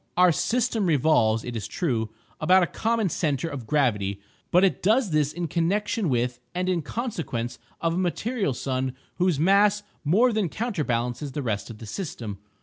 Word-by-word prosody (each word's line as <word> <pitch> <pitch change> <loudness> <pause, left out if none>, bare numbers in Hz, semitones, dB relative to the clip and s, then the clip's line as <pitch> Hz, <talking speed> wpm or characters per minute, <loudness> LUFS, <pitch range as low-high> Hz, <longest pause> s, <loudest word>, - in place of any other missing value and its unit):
Our 180 0 +6
system 220 +5 +1
revolves, 125 -8 +3
it 120 - -5
is 110 -3 -3
true, 115 -10 -1 0.3
about 185 0 +5
a - - +4
common 225 +2 0
centre 155 -2 -1
of 135 -8 -6
gravity, 105 -9 +1 0.3
but 180 +2 +4
it 195 - +2
does 215 +1 +3
this 150 -1 +2
in 170 +1 -3
connection 190 +4 0
with 125 -1 0 0.2
and 180 +1 -1
in 180 -2 +1
consequence 145 - -4 0.2
of 165 0 0
a - - -2
material 195 - -1
sun 130 0 -2 0.2
whose 180 -5 +2
mass 200 +4 +4 0.2
more 220 - +4
than 210 -5 0
counterbalances 135 - -2
the 145 - -3
rest 105 -3 -2
of 115 - -8
the 115 - -9
system. 110 - -5
165 Hz, 170 wpm, -25 LUFS, 125-195 Hz, 0.3 s, Our